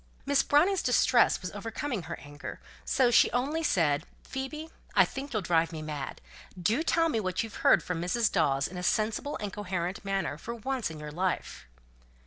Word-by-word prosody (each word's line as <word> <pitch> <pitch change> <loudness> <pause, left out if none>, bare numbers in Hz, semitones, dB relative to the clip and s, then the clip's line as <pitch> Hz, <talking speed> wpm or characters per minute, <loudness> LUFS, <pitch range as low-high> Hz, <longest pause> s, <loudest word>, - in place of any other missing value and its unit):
Miss 280 0 +4
Browning's 350 +6 +3
distress 250 -1 +4
was 180 - -4
overcoming 225 +3 -4
her - - -6
anger; 145 +2 -9 0.2
so 250 -2 +3
she 235 - +6
only 280 +7 0
said, 155 - +1 0.2
"Phoebe, 305 +4 -5 0.2
I - - +7
think 275 +1 -6
you'll 215 -5 -1
drive 165 -1 +2
me 155 -1 -6
mad. 150 -3 -5 0.4
Do 215 - +2
tell 330 0 +2
me 265 -9 0
what 185 0 -1
you 225 - -7
heard - - +4
from 180 -2 -3
Mrs. 210 +6 +1
Dawes 135 -6 +2
in 180 - -9
a - - -3
sensible 220 +9 0
and 205 -2 -5
coherent 185 -2 -3
manner, 195 -6 -2
for 235 +6 -5
once 255 0 -2
in 160 -1 -8
your 150 0 -7
life." 180 - -2
205 Hz, 185 wpm, -29 LUFS, 170-265 Hz, 0.4 s, I